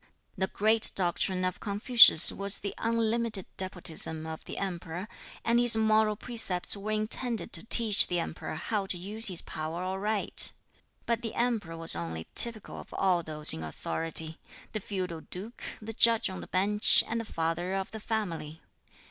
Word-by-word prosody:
The 190 Hz, -, -2 dB
great 220 Hz, +3 st, +3 dB
doctrine 185 Hz, 0 st, +1 dB
of 185 Hz, -1 st, -4 dB
Confucius 210 Hz, -3 st, +6 dB
was 200 Hz, 0 st, -3 dB
the 200 Hz, -, -7 dB
unlimited 230 Hz, -3 st, -1 dB
despotism 165 Hz, -4 st, -1 dB
of 160 Hz, 0 st, -8 dB
the -, -, -9 dB
Emperor, 180 Hz, -1 st, -6 dB, 0.4 s
and 235 Hz, +1 st, +2 dB
his 240 Hz, -2 st, +6 dB
moral 220 Hz, -1 st, +1 dB
precepts 210 Hz, -6 st, +1 dB
were 200 Hz, +1 st, -8 dB
intended 215 Hz, +2 st, -2 dB
to 165 Hz, -, -2 dB
teach 225 Hz, -4 st, +4 dB
the 175 Hz, -, -2 dB
Emperor 160 Hz, -1 st, -6 dB
how 200 Hz, +4 st, -4 dB
to 185 Hz, -, -2 dB
use 210 Hz, +6 st, +1 dB
his 180 Hz, -4 st, 0 dB
power 160 Hz, +3 st, -6 dB
aright. 195 Hz, +3 st, +2 dB, 0.5 s
But 235 Hz, -1 st, -2 dB
the 225 Hz, -2 st, -6 dB
Emperor 220 Hz, -9 st, -3 dB
was 165 Hz, 0 st, +4 dB
only 80 Hz, -1 st, -6 dB
typical 230 Hz, -4 st, 0 dB
of -, -, -14 dB
all 185 Hz, -3 st, 0 dB
those 155 Hz, -2 st, +2 dB
in 80 Hz, -, -7 dB
authority 160 Hz, -, 0 dB, 0.3 s
the 215 Hz, -, -4 dB
feudal 185 Hz, -5 st, -6 dB
duke, 205 Hz, +9 st, -10 dB, 0.2 s
the 225 Hz, +1 st, -8 dB
judge 225 Hz, -2 st, +3 dB
on 185 Hz, -, -8 dB
the -, -, -11 dB
bench, 205 Hz, +3 st, +2 dB
and 230 Hz, +1 st, -3 dB
the 225 Hz, -, -12 dB
father 165 Hz, +3 st, -3 dB
of 195 Hz, -1 st, -5 dB
the 220 Hz, -, -8 dB
family. 170 Hz, -8 st, -6 dB
195 Hz, 165 wpm, -27 LUFS, 170-220 Hz, 0.5 s, Confucius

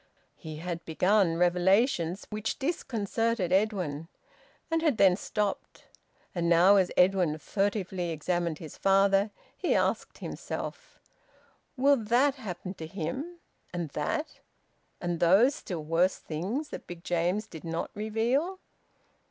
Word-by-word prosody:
He 155 Hz, -1 st, -8 dB
had 170 Hz, +1 st, -5 dB
begun 180 Hz, +1 st, +2 dB
revelations 180 Hz, +1 st, +2 dB
which 215 Hz, +1 st, -2 dB
disconcerted 230 Hz, -, -1 dB
Edwin, 185 Hz, -7 st, 0 dB, 0.6 s
and 325 Hz, 0 st, +2 dB
had 305 Hz, -8 st, +2 dB
then 190 Hz, -4 st, +6 dB
stopped. 205 Hz, +1 st, -3 dB, 0.5 s
And 170 Hz, -2 st, 0 dB
now 180 Hz, +4 st, +6 dB
as 185 Hz, -2 st, +3 dB
Edwin 180 Hz, -4 st, +3 dB
furtively 190 Hz, 0 st, -1 dB
examined 170 Hz, 0 st, -1 dB
his 155 Hz, -1 st, -9 dB
father, 195 Hz, +1 st, +4 dB, 0.3 s
he -, -, 0 dB
asked -, -, 0 dB
himself: -, -, -6 dB, 0.8 s
"Will 280 Hz, +2 st, +5 dB
that 240 Hz, +5 st, +3 dB
happen 195 Hz, -7 st, -6 dB
to 160 Hz, -4 st, -8 dB
him, 200 Hz, -, -5 dB, 0.3 s
and 175 Hz, -3 st, -3 dB
that, 150 Hz, -, -3 dB, 0.6 s
and 175 Hz, -1 st, -2 dB
those 195 Hz, +11 st, +5 dB
still 175 Hz, -, -6 dB
worse 165 Hz, +4 st, +2 dB
things 200 Hz, -, -4 dB
that -, -, -8 dB
Big 175 Hz, -1 st, -9 dB
James 175 Hz, +5 st, 0 dB
did 160 Hz, -, -11 dB
not 165 Hz, 0 st, -3 dB
reveal?" 235 Hz, -, 0 dB
190 Hz, 125 wpm, -29 LUFS, 170-220 Hz, 0.8 s, then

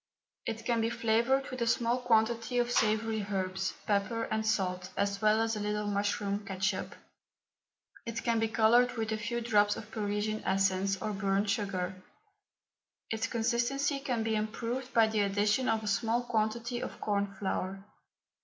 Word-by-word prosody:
It 225 Hz, 0 st, -4 dB
can 235 Hz, -2 st, +1 dB
be 225 Hz, -, +1 dB
flavoured 235 Hz, +4 st, +1 dB
with 255 Hz, -1 st, -5 dB
a 235 Hz, -, +1 dB
small 235 Hz, +1 st, +2 dB
quantity 230 Hz, 0 st, +1 dB
of 240 Hz, 0 st, +1 dB
savoury 220 Hz, -1 st, +1 dB
herbs, 190 Hz, -1 st, -2 dB
pepper, 210 Hz, +3 st, 0 dB
and 220 Hz, 0 st, 0 dB
salt, 185 Hz, -4 st, 0 dB
as 200 Hz, 0 st, 0 dB
well 215 Hz, 0 st, +4 dB
as 225 Hz, 0 st, +1 dB
a -, -, -3 dB
little 210 Hz, 0 st, -1 dB
mushroom 205 Hz, 0 st, -1 dB
ketchup. 195 Hz, 0 st, -2 dB, 1.1 s
It 230 Hz, -1 st, -3 dB
can 230 Hz, -1 st, +2 dB
be 225 Hz, -, +2 dB
coloured 230 Hz, +3 st, +4 dB
with 220 Hz, -1 st, -2 dB
a 220 Hz, -, 0 dB
few 235 Hz, +2 st, -2 dB
drops 205 Hz, -3 st, +3 dB
of 220 Hz, 0 st, -9 dB
Parisian 210 Hz, 0 st, -2 dB
essence, 195 Hz, 0 st, +1 dB
or 215 Hz, -, -3 dB
burnt 200 Hz, +1 st, +1 dB
sugar. 190 Hz, -3 st, -2 dB, 1.1 s
Its 225 Hz, +2 st, -1 dB
consistency 240 Hz, +5 st, 0 dB
can 250 Hz, -5 st, -1 dB
be 220 Hz, 0 st, 0 dB
improved 230 Hz, +4 st, -3 dB
by 230 Hz, -2 st, +5 dB
the 220 Hz, -1 st, -1 dB
addition 210 Hz, +5 st, +2 dB
of 220 Hz, -1 st, +1 dB
a -, -, -4 dB
small 225 Hz, +4 st, +1 dB
quantity 235 Hz, +1 st, -1 dB
of -, -, -6 dB
corn 200 Hz, -1 st, 0 dB
flour. 195 Hz, 0 st, -3 dB
220 Hz, 165 wpm, -31 LUFS, 200-235 Hz, 1.1 s, by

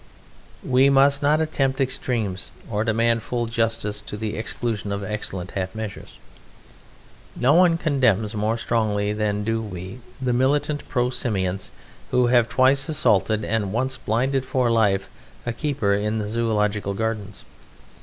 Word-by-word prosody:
We 130 Hz, +2 st, +4 dB
must 140 Hz, +1 st, +4 dB
not 150 Hz, +2 st, +3 dB
attempt 135 Hz, -4 st, 0 dB
extremes 115 Hz, -7 st, -2 dB, 0.2 s
or 105 Hz, 0 st, 0 dB
demand 115 Hz, +1 st, +2 dB
full 120 Hz, +1 st, -2 dB
justice 115 Hz, -2 st, -1 dB
to 105 Hz, -, -7 dB
the 110 Hz, 0 st, -3 dB
exclusion 110 Hz, -2 st, -3 dB
of 100 Hz, 0 st, -3 dB
excellent 95 Hz, -3 st, -4 dB
half 95 Hz, 0 st, -4 dB
measures. 110 Hz, -2 st, -7 dB, 1.2 s
No 130 Hz, +4 st, +3 dB
one 170 Hz, 0 st, +5 dB
condemns 120 Hz, -, +1 dB
more 110 Hz, +2 st, 0 dB
strongly 105 Hz, -3 st, 0 dB
than 105 Hz, -1 st, -1 dB
do 115 Hz, +1 st, -1 dB
we 95 Hz, +1 st, -7 dB, 0.2 s
the 130 Hz, -2 st, 0 dB
militant 145 Hz, +4 st, 0 dB
pro 125 Hz, -1 st, +1 dB
Simians 95 Hz, -6 st, -2 dB, 0.4 s
who 125 Hz, 0 st, +3 dB
have 120 Hz, -2 st, +4 dB
twice 130 Hz, +4 st, +3 dB
assaulted 110 Hz, -8 st, +2 dB
and 110 Hz, -4 st, -1 dB
once 130 Hz, +4 st, -1 dB
blinded 130 Hz, +5 st, 0 dB
for 130 Hz, -2 st, +1 dB
life 100 Hz, -4 st, +2 dB, 0.4 s
a 120 Hz, -, -2 dB
keeper 140 Hz, -6 st, 0 dB
in 105 Hz, +2 st, 0 dB
the 105 Hz, -1 st, -2 dB
Zoological 105 Hz, -3 st, 0 dB
Gardens. 110 Hz, -2 st, -4 dB
115 Hz, 145 wpm, -23 LUFS, 105-130 Hz, 1.2 s, one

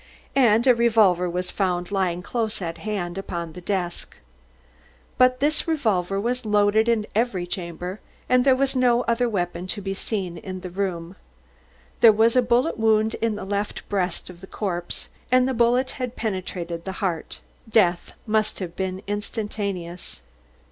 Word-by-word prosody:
And 235 Hz, -4 st, +5 dB
a 255 Hz, -, +7 dB
revolver 215 Hz, -7 st, +3 dB
was 180 Hz, +1 st, -3 dB
found 180 Hz, -2 st, -1 dB
lying 180 Hz, -3 st, 0 dB
close 225 Hz, 0 st, -2 dB
at 165 Hz, -3 st, -5 dB
hand, 195 Hz, -4 st, -3 dB
upon 170 Hz, -4 st, -5 dB
the 180 Hz, -, -9 dB
desk. 175 Hz, -2 st, -3 dB, 1.0 s
But 255 Hz, 0 st, +5 dB
this 300 Hz, +4 st, +1 dB
revolver 200 Hz, -, +1 dB
was 250 Hz, +4 st, -1 dB
loaded 210 Hz, +1 st, +3 dB
in 225 Hz, -2 st, +2 dB
every 210 Hz, -5 st, 0 dB
chamber 180 Hz, +2 st, -5 dB, 0.3 s
and 250 Hz, 0 st, +4 dB
there 265 Hz, -1 st, +5 dB
was 270 Hz, +1 st, 0 dB
no 245 Hz, -1 st, +3 dB
other 235 Hz, +1 st, +1 dB
weapon 175 Hz, -3 st, -2 dB
to 205 Hz, -, -2 dB
be 195 Hz, -1 st, -3 dB
seen 190 Hz, -4 st, -4 dB
in 185 Hz, +2 st, -7 dB
the 180 Hz, -, -7 dB
room. 180 Hz, -1 st, -3 dB, 0.8 s
There 230 Hz, -, +9 dB
was 225 Hz, +3 st, +3 dB
a 255 Hz, -, +6 dB
bullet 245 Hz, +3 st, +1 dB
wound 220 Hz, 0 st, +3 dB
in 225 Hz, -2 st, +1 dB
the 205 Hz, -, -6 dB
left 200 Hz, +1 st, -3 dB
breast 185 Hz, -4 st, -1 dB
of 180 Hz, -1 st, -11 dB
the 190 Hz, -, -10 dB
corpse, 175 Hz, -5 st, -4 dB, 0.2 s
and 255 Hz, 0 st, +5 dB
the 265 Hz, -, 0 dB
bullet 245 Hz, +2 st, +2 dB
had 250 Hz, -2 st, -5 dB
penetrated 180 Hz, -5 st, -4 dB
the 190 Hz, -, -4 dB
heart. 180 Hz, -4 st, -3 dB, 0.3 s
Death 180 Hz, -6 st, +2 dB
must 215 Hz, -1 st, +1 dB
have 175 Hz, -3 st, -6 dB
been 190 Hz, 0 st, -3 dB
instantaneous. 205 Hz, -4 st, -4 dB
205 Hz, 160 wpm, -24 LUFS, 180-230 Hz, 1.0 s, There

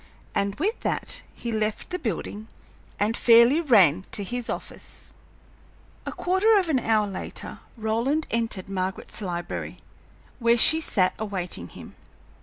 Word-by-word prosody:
And 200 Hz, 0 st, 0 dB
with 405 Hz, -, -1 dB
that -, -, -1 dB
he 235 Hz, -, -5 dB
left 215 Hz, -, -2 dB
the 360 Hz, -, -2 dB
building 215 Hz, -, -4 dB, 0.5 s
and 215 Hz, +3 st, +1 dB
fairly 235 Hz, +7 st, +6 dB
ran 190 Hz, -, +5 dB
to 205 Hz, -, 0 dB
his 245 Hz, +4 st, -4 dB
office. -, -, -7 dB, 1.0 s
A -, -, -2 dB
quarter 385 Hz, +5 st, +3 dB
of 370 Hz, -4 st, +1 dB
an 275 Hz, -5 st, +3 dB
hour 220 Hz, -3 st, +2 dB
later 195 Hz, -2 st, -7 dB, 0.2 s
Roland 230 Hz, +8 st, 0 dB
entered 225 Hz, -5 st, -2 dB
Margaret's 190 Hz, +2 st, -3 dB
library, 175 Hz, -3 st, -4 dB, 0.6 s
where 235 Hz, 0 st, +4 dB
she 315 Hz, +7 st, +5 dB
sat 185 Hz, -11 st, +1 dB
awaiting 180 Hz, -, -4 dB
him. -, -, -12 dB
220 Hz, 135 wpm, -25 LUFS, 195-260 Hz, 1.0 s, fairly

